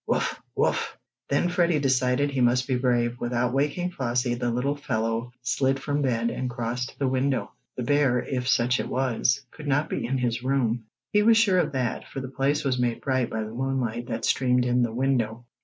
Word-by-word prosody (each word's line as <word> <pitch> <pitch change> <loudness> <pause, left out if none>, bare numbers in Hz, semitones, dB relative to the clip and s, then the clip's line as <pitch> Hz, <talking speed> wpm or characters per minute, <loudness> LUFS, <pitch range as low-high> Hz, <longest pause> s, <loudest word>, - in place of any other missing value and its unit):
"Wuff! - - 0
Wuff!" - - 0 0.3
Then 140 +5 +2
Freddie 175 -2 +2
decided 130 0 +2
he 135 -2 -1
must 125 +1 +3
be 130 - +1
brave. 120 -1 +1
Without 120 0 0
waking 150 +6 0
Flossie, 125 -4 0
the 120 0 -1
little 125 +5 0
fellow 115 -3 -2
slid 135 +1 +1
from 145 +1 -1
bed, 115 -3 +1
and 130 - -3
crossed 120 0 -3
to - - -17
the 140 - 0
window. 130 +1 0 0.2
The 125 - -3
bear, 140 -1 +3
if 125 0 -2
such 125 -1 +3
it - - -2
was, 130 +1 0
could 150 -1 -9
not 145 +2 +1
be - - -2
in 135 +2 0
his 120 -2 -1
room. 125 -3 0 0.3
He 210 - +5
was 225 +1 +5
sure 200 -5 +4
of 175 - 0
that, 125 -3 -2
for - - -6
the 130 -1 -5
place 140 +3 0
was 130 -3 0
made 120 -1 0
bright 130 -3 0
by 110 0 -2
the 110 +1 -7
moonlight 120 -2 -2
that 115 -1 -3
streamed 125 -1 +2
in 125 0 +2
the 120 -2 +1
window. 120 -2 0
125 Hz, 205 wpm, -26 LUFS, 120-135 Hz, 0.3 s, He